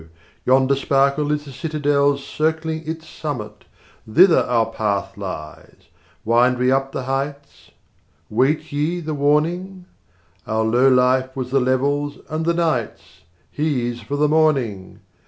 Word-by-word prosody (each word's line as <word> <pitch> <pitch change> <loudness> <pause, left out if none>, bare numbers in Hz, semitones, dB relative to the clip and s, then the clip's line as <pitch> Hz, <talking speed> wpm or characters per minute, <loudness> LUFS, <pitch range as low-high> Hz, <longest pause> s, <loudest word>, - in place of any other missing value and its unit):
Yonder 130 +1 +4
sparkle 140 +2 +1
is 150 0 -2
the 140 - -10
citadel's 145 -1 0
Circling 160 +1 -1
its 160 0 -5
summit. 110 -9 -6 0.4
20 110 +6 -4
Thither 185 -2 +7
our 115 -2 +1
path 105 -3 -2
lies; 90 -6 -9 0.4
wind 120 +3 +3
we 125 +1 +2
up 135 0 0
the 130 - -4
heights: 135 -9 -5 0.6
Wait 130 +8 0
ye 150 +5 -1
the 155 -2 -4
warning? 170 +6 0 0.6
Our 110 +1 0
low 120 +4 +3
life 130 +1 +2
was 130 -2 -4
the 135 - +3
level's 140 +3 0
and 160 +1 -2
the 170 - +2
night's; 120 - -2 0.3
He's 125 -6 -2
for 130 +7 -4
the 150 +1 +2
morning. 135 -11 0
140 Hz, 135 wpm, -21 LUFS, 120-150 Hz, 0.6 s, Thither